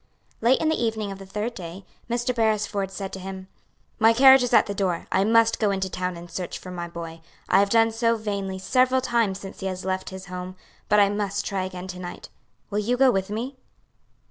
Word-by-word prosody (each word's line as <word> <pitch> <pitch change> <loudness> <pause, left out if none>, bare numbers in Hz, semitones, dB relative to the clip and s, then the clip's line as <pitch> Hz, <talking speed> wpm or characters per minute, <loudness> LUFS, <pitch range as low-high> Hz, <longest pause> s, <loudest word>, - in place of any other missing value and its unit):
Late 240 +4 +4
in 315 - +1
the 315 - 0
evening 220 -3 -1
of 195 - -8
the 195 - -10
third 210 +5 -3
day, 180 0 -8 0.2
Mr. 240 +2 0
Beresford 215 -4 0
said 195 0 -6
to 190 - -5
him, 190 0 -7 0.5
"My 225 +1 +6
carriage 265 +2 +8
is 245 - 0
at 240 - +6
the 200 - -4
door. 190 -4 -1
I 190 - +3
must 230 +1 +4
go 215 - +2
into 190 -1 -1
town 180 -1 -3
and 170 +1 -9
search 175 +1 -5
for 185 - -10
my 175 -1 -5
boy. 165 -1 -8 0.3
I 190 - +5
have 200 0 +3
done 225 +1 +4
so 230 +1 +1
vainly 200 -3 -3
several 255 +6 +2
times 230 -6 0
since 195 0 -9
he 195 - -3
last 185 0 -5
left 185 0 -2
his 190 0 -8
home, 180 0 -7 0.3
but 210 - +5
I 200 -1 +5
must 205 0 -2
try 195 -2 -2
again 185 -1 -7
to 180 -1 -6
night. 175 -1 -8 0.4
Will 205 - 0
you 240 +4 0
go 265 0 +6
with 190 -3 -1
me?" 240 +6 -4
200 Hz, 225 wpm, -25 LUFS, 190-230 Hz, 0.5 s, carriage